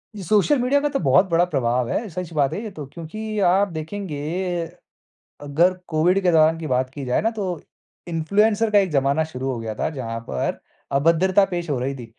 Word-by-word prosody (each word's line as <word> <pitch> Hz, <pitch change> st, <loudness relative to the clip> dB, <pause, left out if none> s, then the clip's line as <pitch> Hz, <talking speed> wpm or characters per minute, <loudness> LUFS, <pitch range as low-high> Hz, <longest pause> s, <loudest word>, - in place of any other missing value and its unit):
ये 200 Hz, -, -7 dB
social 215 Hz, -, +3 dB
media 255 Hz, +4 st, +2 dB
का 295 Hz, -, 0 dB
तो 280 Hz, -, -1 dB
बहुत 140 Hz, +5 st, +4 dB
बड़ा 170 Hz, +1 st, +3 dB
प्रभाव 125 Hz, -6 st, 0 dB
है। 225 Hz, -, -2 dB
सच 180 Hz, -1 st, -6 dB
बात 140 Hz, -3 st, +1 dB
है 210 Hz, -, -3 dB
ये 220 Hz, -, -5 dB
तो 155 Hz, -7 st, -8 dB
क्योंकि 215 Hz, +6 st, -5 dB
आप 195 Hz, +3 st, +3 dB
देखेंगे 160 Hz, -1 st, -5 dB, 1.2 s
अगर 160 Hz, +6 st, +2 dB
कोविड 170 Hz, +4 st, +2 dB
के 180 Hz, -, +4 dB
दौरान 160 Hz, 0 st, +4 dB
की 160 Hz, -, -5 dB
बात 130 Hz, 0 st, 0 dB
की 140 Hz, -2 st, -6 dB
जाए 125 Hz, -, +1 dB
ना 225 Hz, -, +2 dB
तो 200 Hz, -, -2 dB, 0.6 s
इन्फ्लुएंसर 205 Hz, +7 st, +1 dB
का 205 Hz, -, +6 dB
एक 190 Hz, -4 st, 0 dB
ज़माना 140 Hz, +2 st, +2 dB
शुरू 135 Hz, -4 st, -4 dB
हो 120 Hz, -, -4 dB
गया 110 Hz, -1 st, -5 dB
था। -, -, -1 dB
जहाँ 115 Hz, -6 st, -5 dB
पर 65 Hz, -, -2 dB, 0.4 s
अभद्रता 180 Hz, +6 st, +3 dB
पेश 175 Hz, -2 st, -3 dB
हो 135 Hz, -4 st, 0 dB
रही 135 Hz, +2 st, -2 dB
थी 125 Hz, -3 st, -8 dB
165 Hz, 205 wpm, -22 LUFS, 140-200 Hz, 1.2 s, का